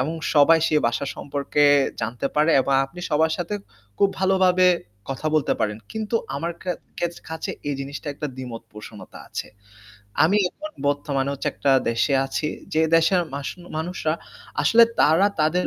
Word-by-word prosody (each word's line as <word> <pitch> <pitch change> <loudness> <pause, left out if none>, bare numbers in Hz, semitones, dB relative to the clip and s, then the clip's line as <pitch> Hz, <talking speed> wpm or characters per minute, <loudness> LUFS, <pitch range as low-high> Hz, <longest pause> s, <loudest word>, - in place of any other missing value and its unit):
এবং 155 +6 -1 0.2
সবাই 160 +3 +6
সে 155 - 0
ভাষা 120 +4 -1
সম্পর্কে 145 +1 -1 0.4
জানতে 120 +4 -2
পারে 150 +2 +3
এবং 135 - 0
আপনি 175 +6 -10
সবার 160 +1 +2
সাথে 180 +3 -3 0.4
খুব 200 - +5
ভালোভাবে 185 -1 +4 0.4
কথা 135 +3 -4
বলতে 155 - +2
পারেন। 105 0 -1
কিন্তু 220 +1 -1 0.2
আমার 170 +4 -3
খে 185 - -2 0.3
খেত 175 0 -1
কাছে 160 0 -4 0.2
এই 145 - -1
জিনিসটা 140 +3 -7
একটা 150 - -4
দ্বিমত 125 -3 -7
পোষণতা 105 -1 -11
আছে। - - -5 0.8
আমি 195 +6 +3
এখন 310 +8 -9 0.2
বর্তমানে 140 -1 -1
হচ্ছে 140 - -2
একটা 140 - +1 0.2
দেশে 115 +4 +1
আছি। 150 +3 -2 0.3
যে 160 - +3 0.2
দেশের 165 +2 +3
মাসু 140 +4 -5 0.2
মানুষরা 160 -1 -2 0.5
আসলে 230 +1 +7 0.2
তারা 165 +6 +5
তাদের 160 +4 +2
155 Hz, 155 wpm, -23 LUFS, 140-180 Hz, 0.8 s, আসলে